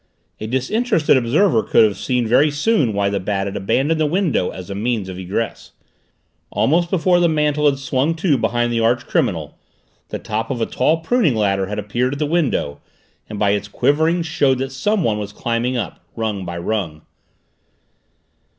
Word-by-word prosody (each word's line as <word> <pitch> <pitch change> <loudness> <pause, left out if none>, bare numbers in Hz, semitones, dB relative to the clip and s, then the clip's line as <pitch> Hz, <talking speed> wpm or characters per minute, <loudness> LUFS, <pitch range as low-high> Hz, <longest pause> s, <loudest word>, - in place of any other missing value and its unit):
A 110 - -5
disinterested 160 - +1
observer 130 - +3
could - - +4
have 105 -3 +2
seen 125 +5 -1
very 125 +7 +4
soon 145 - +1
why 100 -1 0
the 100 0 -1
Bat 95 +1 -2
had 100 - -5
abandoned 140 +11 0
the 155 - +3
window 165 - 0
as 95 +1 -8
a - - -2
means 110 0 -2
of 95 0 -7
egress. 95 +5 -4 0.8
Almost 170 +4 +1
before 180 0 +2
the 175 -1 +3
mantel 150 -1 +1
had 140 -1 +2
swung 135 +3 0
to 160 -2 +1
behind 120 -1 0
the 115 - +1
archcriminal, 115 +2 0 0.5
the - - -4
top 110 +1 -4
of 130 - -3
a 115 - +1
tall 160 +6 +1
pruning 180 - +2
ladder 100 -3 +1
had 105 - -4
appeared 120 +6 -1
at - - -4
the 150 - 0
window 145 - -1 0.5
and 105 - -6
by 100 -1 +2
its 100 0 -1
quivering 160 +10 +1
showed 145 -5 +1
that 135 +1 -3
someone 135 - 0
was 105 -1 -5
climbing 120 +3 -2
up, 115 - -5
rung 105 -4 -3
by 85 0 -5
rung. 85 -4 -3
125 Hz, 180 wpm, -19 LUFS, 105-155 Hz, 0.8 s, could